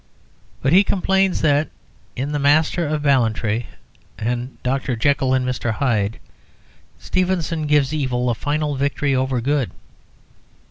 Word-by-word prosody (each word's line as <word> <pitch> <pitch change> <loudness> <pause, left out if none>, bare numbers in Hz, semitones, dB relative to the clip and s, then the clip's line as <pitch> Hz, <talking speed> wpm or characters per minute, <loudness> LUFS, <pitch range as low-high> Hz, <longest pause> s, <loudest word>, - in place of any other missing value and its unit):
But 135 +3 +2
he 190 +3 +7
complains 190 -1 +1
that, 145 0 +2 0.5
in 135 +3 -3
"The 150 - -1
Master 155 +4 +2
of 150 0 -2
Ballantrae" 115 -4 +1 0.5
and 120 +3 -3
"Dr. 130 0 -1
Jekyll 130 +2 +2
and 130 -1 0
Mr. 125 -2 -2
Hyde," 110 -3 0 0.8
Stevenson 175 -4 -1
gives 145 -1 +2
evil 130 -4 -1
a - - +1
final 145 +5 -1
victory 140 +1 0
over 130 -1 0
good. 140 0 0
140 Hz, 130 wpm, -21 LUFS, 125-150 Hz, 0.8 s, he